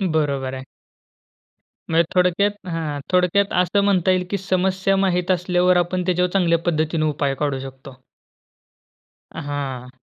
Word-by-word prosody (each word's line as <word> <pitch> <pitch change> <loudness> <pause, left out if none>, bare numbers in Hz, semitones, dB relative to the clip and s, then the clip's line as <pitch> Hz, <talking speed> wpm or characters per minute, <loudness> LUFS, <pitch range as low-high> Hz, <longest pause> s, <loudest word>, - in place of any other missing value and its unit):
बरोबर 140 -4 -1
आहे. 130 - -6 1.3
म्हणजे 165 +1 +4
थोडक्यात 185 +2 +1
हां. 160 -4 -3
थोडक्यात 180 +2 +2
असं 200 +3 +1
म्हणता 190 -2 +2
येईल, 185 0 +1
की 200 - -1
समस्या 190 +1 0
माहीत 185 -2 +1
असल्यावर 180 0 +2
आपण 175 +1 0
त्याच्यावर 180 0 +1
चांगल्या 170 -4 +2
पद्धतीने 155 -1 0
उपाय 145 -2 0
काढू 140 -1 -2
शकतो. 135 0 -10 1.4
हां. 135 -4 -5
175 Hz, 125 wpm, -21 LUFS, 145-185 Hz, 1.4 s, म्हणजे